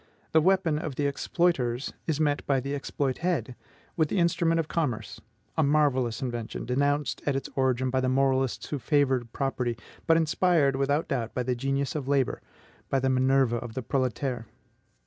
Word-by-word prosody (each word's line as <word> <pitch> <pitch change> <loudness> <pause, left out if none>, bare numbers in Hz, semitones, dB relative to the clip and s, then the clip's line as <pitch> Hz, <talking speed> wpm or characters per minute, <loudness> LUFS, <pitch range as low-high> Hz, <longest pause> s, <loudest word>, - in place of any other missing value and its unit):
The 160 - +5
weapon 175 -3 +2
of 155 -4 -5
the 145 - -1
EXPLOITERS 140 -4 0
is 155 -2 0
met 145 -2 +1
by 135 -2 +3
the 135 +2 -4
EXPLOITED 140 -1 -1 0.4
with 160 -3 +1
the - - -1
instrument 170 -1 +2
of 160 - -1
commerce, 145 -11 -2 0.3
a 160 - +2
marvellous 140 -6 +2
invention, 120 -3 -4
denounced 145 +4 0
at 140 - +2
its 135 - -3
origin 130 -1 +1
by 130 - +1
the 130 - +1
moralists 135 -1 +1
who 145 - -2
favored 130 -3 +1
property, 125 -4 -2 0.3
but 165 0 +5
inspired 160 -3 +2
without 140 +3 0
doubt 115 -2 -2
by 125 - 0
the 125 +1 0
genius 135 +2 -1
of 145 -4 -4
labor, 140 -2 +1 0.5
by 135 - +2
the 130 0 +1
Minerva 130 -2 +3
of 120 -1 -7
the 130 - -3
proletaires. 130 -1 -1
135 Hz, 170 wpm, -27 LUFS, 130-150 Hz, 0.5 s, The